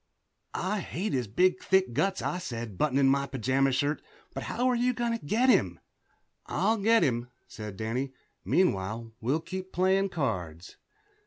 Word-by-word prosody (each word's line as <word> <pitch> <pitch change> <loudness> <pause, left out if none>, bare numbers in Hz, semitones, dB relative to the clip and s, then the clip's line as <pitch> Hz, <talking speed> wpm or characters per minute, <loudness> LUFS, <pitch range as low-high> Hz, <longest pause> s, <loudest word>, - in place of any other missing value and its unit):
"I 205 +3 -1
hate 185 +2 -3
his 125 -4 0
big 180 - +2
thick 190 -8 +2
guts," 195 +9 0
I 180 - -1
said, 120 - -5
buttoning 140 +2 +2
my 140 +1 +2
pajama 135 +1 +1
shirt, 145 +4 0 0.3
"but - - -4
how 250 - 0
are 250 - +3
you 250 +1 +2
going 240 0 -1
to - - -8
get 225 - +2
him?" 255 - +3 0.7
"I'll 225 +1 +1
get 225 +2 +4
him," 120 -1 0 0.2
said 105 -3 -8
Danny. 120 +5 -2 0.3
"Meanwhile, 115 - 0
we'll 135 +8 0
keep 185 +2 -6
playing 190 +2 +2
cards." 90 - -3
145 Hz, 160 wpm, -29 LUFS, 120-190 Hz, 0.7 s, get